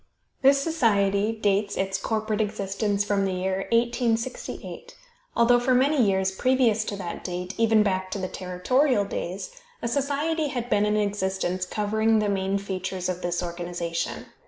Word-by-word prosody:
This 275 Hz, +1 st, +6 dB
society 215 Hz, -9 st, +2 dB
dates 205 Hz, -2 st, 0 dB
its 190 Hz, 0 st, -1 dB
corporate 215 Hz, +1 st, -1 dB
existence 205 Hz, -1 st, -1 dB
from 205 Hz, -1 st, +1 dB
the 190 Hz, -1 st, 0 dB
year 190 Hz, +1 st, -2 dB
1868, 235 Hz, +1 st, -1 dB, 0.4 s
although 240 Hz, +1 st, +5 dB
for 250 Hz, +1 st, +2 dB
many 275 Hz, +2 st, +3 dB
years 190 Hz, -3 st, +2 dB
previous 235 Hz, 0 st, +2 dB
to 205 Hz, -, -3 dB
that 180 Hz, -3 st, -6 dB
date, 180 Hz, +1 st, -4 dB
even 225 Hz, -1 st, +5 dB
back 185 Hz, -2 st, -1 dB
to 195 Hz, -, -3 dB
the 190 Hz, -1 st, -2 dB
territorial 205 Hz, +7 st, +1 dB
days, 190 Hz, -, -5 dB, 0.3 s
a -, -, -3 dB
society 290 Hz, +5 st, 0 dB
had 245 Hz, -4 st, -4 dB
been 210 Hz, 0 st, +3 dB
in 210 Hz, 0 st, +1 dB
existence 190 Hz, -3 st, -1 dB
covering 220 Hz, +2 st, +1 dB
the 210 Hz, -1 st, +1 dB
main 195 Hz, 0 st, 0 dB
features 190 Hz, -2 st, -3 dB
of 180 Hz, 0 st, -3 dB
this 175 Hz, 0 st, -1 dB
organization. 170 Hz, -1 st, -4 dB
205 Hz, 155 wpm, -25 LUFS, 190-235 Hz, 0.4 s, This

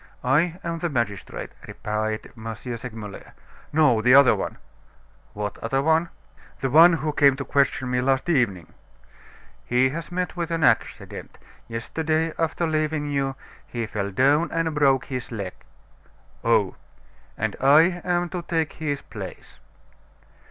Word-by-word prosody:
"I 160 Hz, +7 st, +2 dB
am 170 Hz, -1 st, -3 dB
the 175 Hz, -, -1 dB
magistrate," 115 Hz, -8 st, -3 dB, 0.2 s
replied 110 Hz, +1 st, -3 dB
M. 115 Hz, -1 st, -6 dB
Segmuller. 115 Hz, -4 st, -8 dB, 0.4 s
"No, 145 Hz, -7 st, +4 dB
the 125 Hz, +3 st, +6 dB
other 140 Hz, -2 st, +7 dB
one." -, -, -4 dB, 0.8 s
"What 105 Hz, -1 st, -4 dB
other 135 Hz, +4 st, 0 dB
one?" 160 Hz, +2 st, +2 dB, 0.5 s
"The 135 Hz, -, -1 dB
one 165 Hz, +4 st, +8 dB
who 155 Hz, -2 st, -1 dB
came 140 Hz, -2 st, +5 dB
to 135 Hz, 0 st, -5 dB
question 135 Hz, -1 st, +1 dB
me 125 Hz, 0 st, +1 dB
last 135 Hz, +3 st, +1 dB
evening." 115 Hz, -, 0 dB, 0.9 s
"He 125 Hz, +6 st, +2 dB
has 165 Hz, +5 st, -6 dB
met 180 Hz, -1 st, -2 dB
with 170 Hz, -2 st, -3 dB
an 165 Hz, -1 st, -1 dB
accident. -, -, 0 dB, 0.3 s
Yesterday, 155 Hz, +7 st, -1 dB
after 165 Hz, +1 st, 0 dB
leaving 155 Hz, -2 st, -1 dB
you, 135 Hz, -1 st, -1 dB, 0.3 s
he 120 Hz, -1 st, -3 dB
fell 100 Hz, -2 st, -3 dB
down 140 Hz, -, +3 dB
and 165 Hz, -1 st, 0 dB
broke 135 Hz, -3 st, +3 dB
his 125 Hz, -3 st, -5 dB
leg." 100 Hz, -5 st, -4 dB, 0.9 s
"Oh!" -, -, +2 dB, 0.6 s
"And 110 Hz, -1 st, -1 dB
I 160 Hz, +6 st, +5 dB
am 175 Hz, -1 st, 0 dB
to 180 Hz, 0 st, -4 dB
take 165 Hz, -2 st, -1 dB
his 145 Hz, -3 st, -3 dB
place." -, -, -9 dB
140 Hz, 140 wpm, -24 LUFS, 120-160 Hz, 0.9 s, one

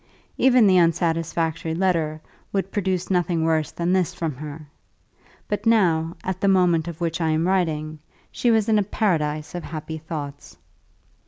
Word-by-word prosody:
Even 255 Hz, -3 st, +5 dB
the 185 Hz, -2 st, +5 dB
unsatisfactory 165 Hz, -1 st, 0 dB
letter 165 Hz, -4 st, 0 dB, 0.3 s
would 195 Hz, -1 st, -2 dB
produce 190 Hz, -3 st, -1 dB
nothing 175 Hz, -2 st, +1 dB
worse 160 Hz, -2 st, +1 dB
than 175 Hz, +1 st, -1 dB
this 185 Hz, -1 st, +1 dB
from 165 Hz, -4 st, -2 dB
her; 150 Hz, +1 st, -8 dB, 0.8 s
but 210 Hz, +2 st, -2 dB
now, 170 Hz, -7 st, +3 dB
at 185 Hz, 0 st, -3 dB
the 200 Hz, -, +2 dB
moment 180 Hz, -4 st, +3 dB
of 170 Hz, -1 st, -6 dB
which 170 Hz, 0 st, -2 dB
I 160 Hz, -, +1 dB
am 160 Hz, +2 st, +1 dB
writing, 155 Hz, -5 st, -1 dB, 0.3 s
she 240 Hz, -, 0 dB
was 220 Hz, -2 st, +3 dB
in 215 Hz, -1 st, +4 dB
a -, -, +2 dB
paradise 155 Hz, -7 st, -1 dB
of 175 Hz, -, -4 dB
happy 160 Hz, 0 st, -6 dB
thoughts. 145 Hz, -3 st, -7 dB
170 Hz, 160 wpm, -23 LUFS, 160-190 Hz, 0.8 s, Even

